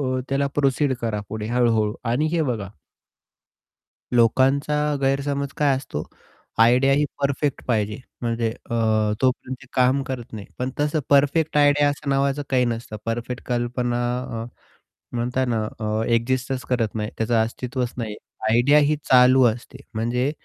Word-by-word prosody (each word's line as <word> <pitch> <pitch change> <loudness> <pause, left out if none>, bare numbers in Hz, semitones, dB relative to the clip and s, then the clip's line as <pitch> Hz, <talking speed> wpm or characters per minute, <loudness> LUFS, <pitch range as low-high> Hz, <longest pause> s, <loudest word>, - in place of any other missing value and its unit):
अ, 130 -2 -1
त्याला 140 +1 +1
प्रोसीड 140 -1 +2
करा. 110 -3 -2
पुढे 110 0 -4
हळू-हळू 115 -3 +1 0.2
आणि 135 +6 +1
हे 170 - +2
बघा 115 -9 -2 1.5
लोकांचा 130 +5 +3 0.3
गैरसमज 140 +1 0
काय 145 -2 +3
असतो 130 - -5 0.6
आयडिया 125 +4 +5
ही 145 +2 +2 0.2
परफेक्ट 140 0 -1
पाहिजे 105 -3 0 0.2
म्हणजे 115 -1 0
अ, 115 - -7 0.5
तोपर्यंत 130 0 -1
काम 130 +2 +3
करत 130 -4 -6
नाही, 105 -2 -7
पण 125 +1 -1
तसं 150 +1 +1
परफेक्ट 145 +2 +3
आयडिया 145 0 +4
असं 145 0 -4
नावाचं 140 +1 +1
काही 125 -2 +3
नसतं. 115 -2 -4
परफेक्ट 120 +2 -3
कल्पना 120 0 -1 0.4
अ, - - -7 0.7
म्हणता 125 +2 0
ना 115 -3 0 0.2
अ, 110 0 -1
एक्सिस्टच 130 +2 -1
करत 115 -4 0
नाही. 105 0 -2
त्याचं 115 +1 0
अस्तित्वच 125 +2 -3
नाही 110 -3 -4 0.3
आयडिया 120 +6 +5
ही 150 +1 +3
चालू 130 0 +6
असते. 120 +3 -4 0.2
म्हणजे 120 +5 0
125 Hz, 140 wpm, -23 LUFS, 115-140 Hz, 1.5 s, चालू